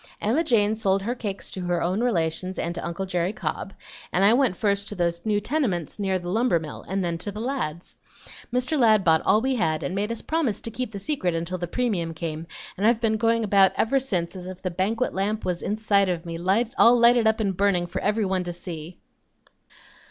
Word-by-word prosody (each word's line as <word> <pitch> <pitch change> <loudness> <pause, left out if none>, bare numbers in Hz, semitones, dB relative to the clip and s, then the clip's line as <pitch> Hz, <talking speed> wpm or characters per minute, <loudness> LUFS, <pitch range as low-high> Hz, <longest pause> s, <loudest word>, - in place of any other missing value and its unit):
"Emma 245 +11 +1
Jane 220 -7 +3
sold 195 -3 +1
her 235 +4 -1
cakes 210 -5 -5
to 190 - -5
her 175 -1 0
own 180 +6 0
relations 185 -5 0
and 170 - -2
to - - -6
uncle 170 +3 -3
Jerry 180 +1 -1
Cobb, 195 - -4 0.4
and 190 +2 +3
I 210 - +6
went 250 -6 +2
first 200 -1 0
to 205 - -5
those 170 -2 -1
new 210 -1 +2
tenements 210 - -2
near 190 -2 0
the 175 -1 -7
lumber 220 -4 +2
mill, 155 -2 -8
and 190 +2 -1
then 170 -1 -2
to 205 - -4
the 210 - -7
Ladds'. 220 - -4 0.5
Mr. 250 +5 0
Ladd 215 -4 +5
bought 160 -2 +4
all 215 - +3
we 265 +2 0
had 160 -10 0
and - - -3
made 205 +3 -1
us 230 - -5
promise 310 -10 0
to 230 - -5
keep 250 0 -4
the 205 - -6
secret 190 - -1
until 170 +2 -3
the 175 - -3
premium 175 -7 -1
came, 160 0 -5 0.3
and 205 +3 +2
I've 230 -1 +3
been 220 -2 +1
going 230 +1 +2
about 195 -2 +4
ever 270 +5 +2
since 185 -10 -2
as 180 -1 -7
if 185 0 -9
the 185 - -2
banquet 210 +8 -1
lamp 210 +3 -1
was 180 -1 -1
inside 205 -2 +1
of 175 -1 -2
me 165 -1 -5 0.4
all 240 +1 +7
lighted 235 -1 +5
up 220 +1 +2
and 200 -3 0
burning, 195 -2 +2
for 175 - -5
everybody 195 -3 0
to 175 - -4
see." 170 -1 -8
195 Hz, 220 wpm, -25 LUFS, 175-225 Hz, 0.5 s, all